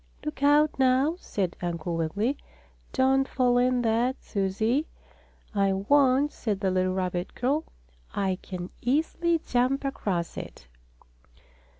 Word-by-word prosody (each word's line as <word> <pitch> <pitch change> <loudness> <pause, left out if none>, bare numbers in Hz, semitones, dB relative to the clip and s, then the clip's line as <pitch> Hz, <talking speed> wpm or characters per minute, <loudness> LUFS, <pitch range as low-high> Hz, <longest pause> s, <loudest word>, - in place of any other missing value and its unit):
"Look 300 -2 -5
out, 290 +1 +4
now!" 265 +5 +3
said 190 - -2
Uncle 170 -1 -3
Wiggily. 200 - 0 0.6
"Don't 270 0 +3
fall 245 -2 +2
in 250 0 +2
that, 235 +3 +1
Susie." 220 +9 0 0.7
"I 195 -2 +2
won't," 270 +7 +3
said 210 -4 -2
the 195 -2 0
little 185 0 +1
rabbit 180 -1 -2
girl. 280 +6 0 0.5
"I 190 -2 -1
can 180 -1 -7
easily 325 +6 +1
jump 255 +3 +1
across 190 -10 -2
it." - - -8
245 Hz, 120 wpm, -27 LUFS, 190-270 Hz, 0.7 s, out